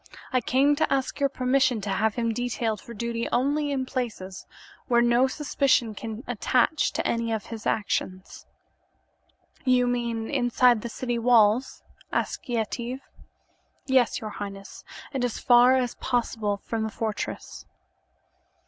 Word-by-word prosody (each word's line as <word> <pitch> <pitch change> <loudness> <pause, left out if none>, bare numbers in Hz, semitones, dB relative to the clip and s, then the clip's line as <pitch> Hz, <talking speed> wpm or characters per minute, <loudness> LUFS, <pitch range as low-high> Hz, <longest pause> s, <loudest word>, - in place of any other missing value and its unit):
I 255 - +3
come 275 +5 +3
to 315 - +1
ask 270 -1 -1
your 280 -1 +2
permission 260 -2 +1
to 200 0 -3
have 215 +2 +1
him 230 -1 0
detailed 235 -3 -2
for - - -12
duty 235 +1 -3
only 290 +4 +1
in 265 -2 -1
places 225 -8 -5 0.4
where 240 -2 +4
no 240 +2 +4
suspicion 265 -5 +1
can 225 +2 -7
attach 250 +5 +1
to - - -2
any 230 -1 0
of 220 -2 -2
his 225 -2 -6
actions." 185 -3 -2 1.2
"You 255 -1 +3
mean 235 -2 -1
inside 245 -3 +3
the 235 - -5
city 240 0 -3
walls?" 230 +1 +3 0.3
asked - - -2
Yetive. 240 +2 -2 0.8
"Yes, 260 -3 +2
your 215 -1 -6
highness, 200 -1 -8 0.3
and 265 -2 -1
as 245 -2 -1
far 245 +1 +6
as 250 -2 0
possible 225 -5 -1
from 225 +2 -4
the 220 - -1
fortress." 220 0 -5
240 Hz, 140 wpm, -26 LUFS, 220-255 Hz, 1.2 s, far